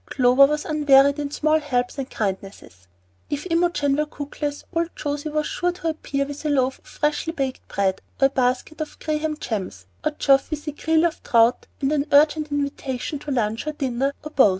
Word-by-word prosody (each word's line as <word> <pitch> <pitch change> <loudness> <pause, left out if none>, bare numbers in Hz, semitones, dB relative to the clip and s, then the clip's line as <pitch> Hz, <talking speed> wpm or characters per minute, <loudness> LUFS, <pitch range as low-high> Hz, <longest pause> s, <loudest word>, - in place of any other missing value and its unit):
Clover 255 +2 +5
was 300 +1 -2
unwearied 285 -2 +4
in 290 -1 -2
small 310 +2 +2
helps 250 -2 -1
and 270 0 -4
kindnesses. 195 - -5 0.4
If 290 +2 -3
Imogen 330 -5 +2
were 300 +1 0
cookless, 290 0 -5
old 335 0 -1
José 290 +1 -3
was 305 0 0
sure 355 +3 -1
to 335 -2 -3
appear 280 -3 -2
with 285 +1 -8
a 305 - 0
loaf 265 -2 +1
of - - -33
freshly 300 +2 -1
baked 270 -5 -3
bread, 190 -1 0 0.2
or 270 - +5
a - - +5
basket 260 +4 0
of 310 - -6
graham 310 0 -2
gems; 190 - -4 0.2
or - - +2
Geoff 275 0 +3
with 310 0 -5
a - - 0
creel 320 +2 +2
of 335 - -1
trout 230 +1 +3
and 275 +1 +1
an 295 -1 0
urgent 300 +1 +4
invitation 280 -1 -3
to 295 - -8
lunch 230 -1 -1
or 305 - -1
dinner 270 0 -1
or 305 - -7
both. 265 -8 +6
285 Hz, 195 wpm, -23 LUFS, 260-305 Hz, 0.4 s, both